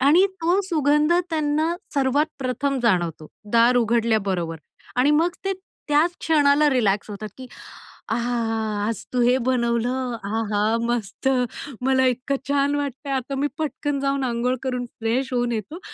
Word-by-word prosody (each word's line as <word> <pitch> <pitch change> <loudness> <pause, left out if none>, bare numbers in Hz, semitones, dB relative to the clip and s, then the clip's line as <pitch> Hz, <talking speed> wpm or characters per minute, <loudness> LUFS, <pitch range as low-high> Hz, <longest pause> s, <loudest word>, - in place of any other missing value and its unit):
आणि 320 +9 +5 0.2
तो 355 +4 +3
सुगंध 300 0 +3 0.2
त्यांना 310 +1 +1 0.2
सर्वात 280 +2 +2
प्रथम 270 +1 -1
जाणवतो, 175 -8 +1 0.3
दार 235 +2 +5
उघडल्याबरोबर. 215 -8 +1 0.4
आणि 265 +4 +4
मग 325 +4 +3
ते 390 - +1 0.4
त्याच 300 +4 +4
क्षणाला 295 -1 +4
रिलॅक्स 210 -5 +1
होतात, 210 +1 -6
की 255 - -8 0.6
"आहा! 240 +2 -1 0.5
आज 230 - -3
तू 250 - +2
हे 250 +2 +4
बनवलं, 245 0 0
आहा 215 +1 0
मस्त, 240 +2 -1 0.5
मला 260 0 +3
इतकं 255 +3 -1
छान 285 0 +2
वाटतंय. 280 0 -4
आता 265 +1 -2
मी 285 +2 +1
पटकन 290 -2 -2
जाऊन 275 -1 0
अंघोळ 245 +1 0
करून 250 -1 -2
फ्रेश 250 +4 -1
होऊन 240 -1 +1
येतो 230 - -4
255 Hz, 140 wpm, -23 LUFS, 230-285 Hz, 0.6 s, आणि